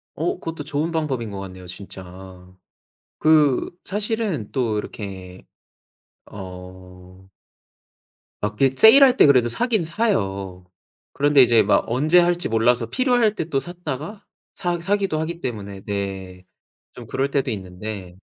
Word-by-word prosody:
어 370 +2 -1
그것도 165 -2 -6
좋은 155 +3 -2
방법인 135 -9 -2
것 100 -1 -6
같네요. 95 -1 -10
진짜. 95 -1 -11 0.7
그 155 -4 +3 0.2
사실은 205 - -2
또 120 -5 -1
이렇게 95 -3 -8 0.9
어 90 -1 -11 1.2
마켓 125 +6 0
세일할 255 - +8
때 - - +7
그래도 130 -4 +5
사긴 230 - 0
사요. 100 - -2 0.5
그런데 145 -1 +4
이제 120 -3 +5
막 - - +2
언제 150 +9 +3
할지 175 0 +1
몰라서 115 +1 +2
필요할 245 - +2
때 165 - -3
또 140 - 0
샀다가 175 +3 -6 0.3
사 175 -2 -2
사기도 195 -3 0
하기 170 +2 -4
때문에 100 -5 -5
네. 95 -2 -5 0.5
좀 - - -11
그럴 140 +1 -1
때도 140 -2 0
있는데 95 -1 -7
125 Hz, 250 characters per minute, -22 LUFS, -, 1.2 s, 세일할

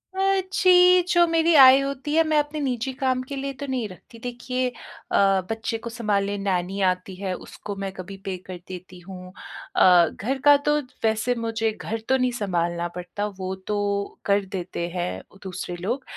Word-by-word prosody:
अ, 390 0 +2
जी 360 -1 +6
जो 345 -1 +5
मेरी 330 0 +3
आय 265 -1 +9
होती 275 +1 -3
है 325 - +5
मैं 310 -1 +2
अपने 295 +1 -2
निजी 255 -2 -1
काम 260 -1 0
के 280 +2 -7
लिए 275 0 -4
तो 285 - -4
नहीं 255 -4 -2
रखती 195 +5 -14
देखिए 250 +1 -2
अ, 195 -5 0
बच्चे 225 0 -2
को 230 +1 -7
संभालने 205 -3 -1
नैनी 195 -1 -1
आती 185 +1 -2
है 190 0 -3
उसको 200 +2 -8
मैं 195 - -3
कभी 195 +1 -8
पे 190 -1 -2
कर 185 -1 -6
देती 185 0 -9
हूँ 185 0 -10 0.4
अ, 180 -2 +6
घर 260 +7 -3
का 290 0 +9
तो 295 0 +4 0.3
वैसे 220 +2 +1
मुझे 225 -1 -1
घर 220 +1 -5
तो 265 - +4
नहीं 255 -1 +1
संभालना 175 -2 -1
पड़ता 180 +3 -4
वो 185 0 -3
तो 205 -1 -2
कर 200 0 +2
देते 185 -3 -4
हैं 175 0 -3 0.2
दूसरे 185 -1 -5
लोग, 225 +10 -3
220 Hz, 180 wpm, -24 LUFS, 185-265 Hz, 0.4 s, आय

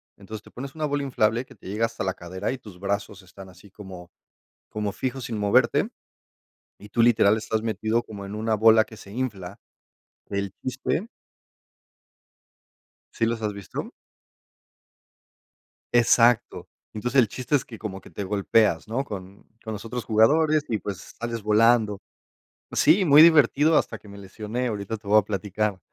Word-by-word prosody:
Entonces, 105 +2 -10
te - - -16
pones 135 +3 -8
una 155 -1 -2
bola 145 -1 -1
inflable 115 -2 +1
que - - -17
te - - -14
llega 105 +4 0
hasta 115 -4 -6
la 95 - 0
cadera 95 +6 -5
y - - -5
tus 105 -7 -14
brazos 100 0 -3
están 95 +1 -13
así 100 +2 -17
como 95 -3 -11 0.6
como 105 -1 -3
fijos, 130 +2 -4
sin 115 -2 -4
moverte, 110 +4 +2 0.9
y 105 - -13
tú, 115 - +2
literal, 110 -3 +4
estás 110 0 -2
metido 110 +1 -1
como 100 -3 -9
en 100 +2 -7
una 110 +1 0
bola 110 +1 +5
que 110 - -14
se 100 - -13
infla. 100 -7 -5 0.7
El 100 -1 -2
chiste 135 - -2 2.1
¿Sí 115 - 0
los 115 0 -2
has 105 -1 -1
visto? 100 -1 -7 2.0
Exacto. 120 0 +3 0.2
Entonces, 125 +5 +2
el 115 - +2
chiste 130 +6 -4
es 130 - -2
que 115 - -11
como 95 -3 -6
que - - -16
te 100 - -5
golpeas, 100 -3 +1
¿no?, 125 +5 -1
con 100 -4 -9 0.2
con 110 - -6
los 105 +1 -7
otros 120 +1 -5
jugadores 150 +8 +3
y, 110 - -1
pues, 100 -3 -8
sales 115 -1 -4
volando 110 -1 +3 0.7
Sí, 185 +6 +4
muy 150 -3 +7
divertido, 155 -1 +6
hasta - - 0
que 105 - -17
me 100 - -11
lesioné, 105 +5 -4
ahorita 105 0 -4
te 105 - -19
voy 105 +1 +5
a - - +4
platicar. 105 0 -2
110 Hz, 165 wpm, -25 LUFS, 100-120 Hz, 2.1 s, muy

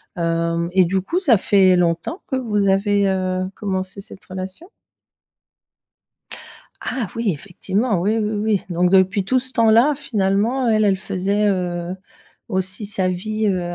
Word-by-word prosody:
Hem 170 0 -1
et 185 0 +4
du 190 +2 0
coup 335 - -1
ça 270 - +4
fait 190 -2 +4
longtemps 175 - 0
que 265 - -2
vous 210 -5 0
avez, 200 +1 +2
heu, 185 -1 -1
commencé 190 -1 -4
cette 195 - -11
relation? 190 - -8 2.1
Ah 245 -6 -3
oui, 230 -4 0
effectivement! 195 - -2
Oui, 210 +5 +1
oui, 210 -1 -1 0.3
oui. - - -14
Donc 175 +1 +1
depuis 190 +1 +3
tout 255 +7 +2
ce 260 +1 -5
temps-là 230 +4 +4
finalement 230 0 0
elle, 215 -1 +3
elle 195 -2 +3
faisait, 200 +2 -1
heu, 180 -2 -2 0.5
aussi 190 +1 -2
sa 190 -2 -1
vie, 215 +4 -2
heu, 180 -3 -1
195 Hz, 150 wpm, -20 LUFS, 185-215 Hz, 2.1 s, et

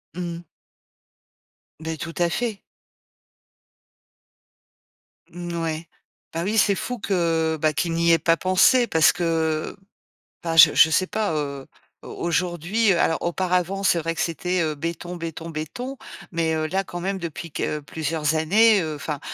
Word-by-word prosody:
Mmh. 175 -1 -5 1.4
Beh 160 0 -5
tout 165 +2 -6
à 175 -1 +2
fait. 230 -4 -2 2.7
Mmh 175 0 -7
n 170 - -4
ouais, 160 0 -3 0.5
bah 165 +1 -2
oui, 210 +4 -1
c'est 205 -2 +4
fou 250 +4 -4
que, 165 -5 0
bah, 155 -1 +2
qu'ils 165 +3 -1
n'y 170 0 +3
aient 165 - +5
pas 165 - +3
pensé 230 +7 +4
parce 160 -1 +5
que, 160 -2 -1 0.7
bah, 165 -1 -2
je - - +9
je 160 - +6
sais 185 +4 +2
pas, 210 -4 -1
heu, 140 -3 -3 0.4
au - - -10
aujourd'hui, 175 +5 0
heu, 175 - +2
alors 160 - +1
auparavant, 180 +2 -1
c'est 195 -3 +3
vrai 165 +1 -2
que - - -3
c'était, 180 +2 -1
heu, 155 -2 -1
béton, 170 +3 -5
béton, 165 -1 -6
béton. 165 - -5 0.4
Mais, 165 -1 0
heu, 155 0 -1
là, 190 +4 -1
quand 175 -1 -7
même, 195 +2 -2
depuis 170 -2 -7
que 150 - -2
plusieurs 155 +1 -2
années, 205 +6 +4
heu, 155 -2 -3
enfin, 145 0 -5
170 Hz, 160 wpm, -23 LUFS, 160-185 Hz, 2.7 s, je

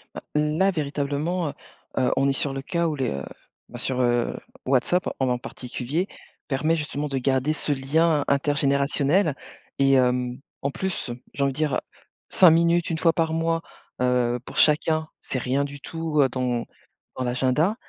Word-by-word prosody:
Heu, - - -4 0.2
n 150 +3 0
à 195 +1 +5
véritablement, 150 +2 -1
heu, - - -7 0.4
heu, 130 -1 +3
on 135 +1 +3
est 140 - +2
sur 135 0 0
le, 135 - -4
cas 170 +4 0
où 155 - -1
le, 120 - -2 0.5
ben, - - -8
sur 130 -1 -1
,heu, 120 -1 +1 0.3
WhatsApp, 140 +7 +2
en 125 -2 +1
particulier, 130 +7 -4 0.4
permet 155 +4 +1
justement 150 -2 -3
de 135 -2 -2
garder 130 +3 +1
ce 150 0 -1
lien 145 +3 +2
intergénérationnel 140 +3 +2 0.4
et 135 0 +5
hem, 125 -1 +2 0.2
en 140 - -1
plus, 185 -6 -3 0.2
j'ai 140 - -1
envie 140 - +2
de - - -11
dire, 150 -3 +1 0.5
5 185 - +7
minutes 170 +1 +3
1 165 - -1
fois 165 0 +3
par 160 0 0
mois, 165 0 0 0.4
heu, 125 -1 +2
pour - - -9
chacun, 155 +1 +3
c'est 130 - -2
rien 130 +3 0
du 140 0 -6
tout, 160 0 -1
heu, 135 - +4
dans 125 -2 -1 0.5
dans 130 - -2
l'agenda. 130 - +1
140 Hz, 170 wpm, -25 LUFS, 130-160 Hz, 0.5 s, 5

